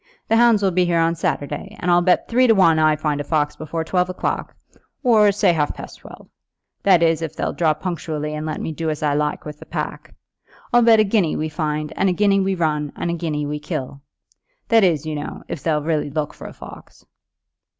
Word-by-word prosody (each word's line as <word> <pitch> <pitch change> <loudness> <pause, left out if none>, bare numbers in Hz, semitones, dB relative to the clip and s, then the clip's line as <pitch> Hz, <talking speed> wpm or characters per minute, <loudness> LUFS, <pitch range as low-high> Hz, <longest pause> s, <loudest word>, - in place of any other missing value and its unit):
"The 225 - +4
hounds 230 -3 +4
will 190 - +3
be 180 +1 +2
here 175 -1 +1
on 165 0 +2
Saturday, 145 -3 -3
and 180 - 0
I'll 175 0 +5
bet 180 0 +2
three 250 +2 +3
to 225 - +5
one 165 -5 +4
I 155 -1 +4
find 150 -1 -2
a - - -4
fox 150 0 0
before 160 +1 -4
twelve 180 +2 0
o'clock, 185 - -3 0.5
or, 215 -5 +5
say, 195 -3 +2
half 150 -3 -1
past - - -10
twelve, - - -13 0.5
that 185 -4 +4
is, 165 -1 +2
if 160 -1 -5
they'll - - -2
draw 160 -3 +1
punctually 155 -3 -4
and 150 0 -4
let 155 0 -4
me - - -4
do 160 +1 -3
as 155 0 -4
I 145 -1 +2
like 150 +1 -1
with 150 -1 -8
the - - -11
pack. - - -5 0.6
I'll 240 - +6
bet 230 -2 +6
a - - +6
guinea 195 -6 +1
we 155 +1 -2
find, 150 -1 -3
and 195 - +2
a - - +1
guinea 200 +1 +3
we 195 0 0
run, 150 -4 -1
and 170 - -2
a - - -1
guinea 155 -3 -2
we 150 +1 -4
kill; 140 -1 -5 0.7
that 225 -3 +5
is, 165 -5 +2
you 155 - -3
know, 145 -1 -6
if 145 - -6
they'll 150 -2 0
really 155 -2 -1
look 150 0 -3
for - - -10
a - - -9
fox." - - -13
165 Hz, 230 wpm, -21 LUFS, 150-185 Hz, 0.7 s, I'll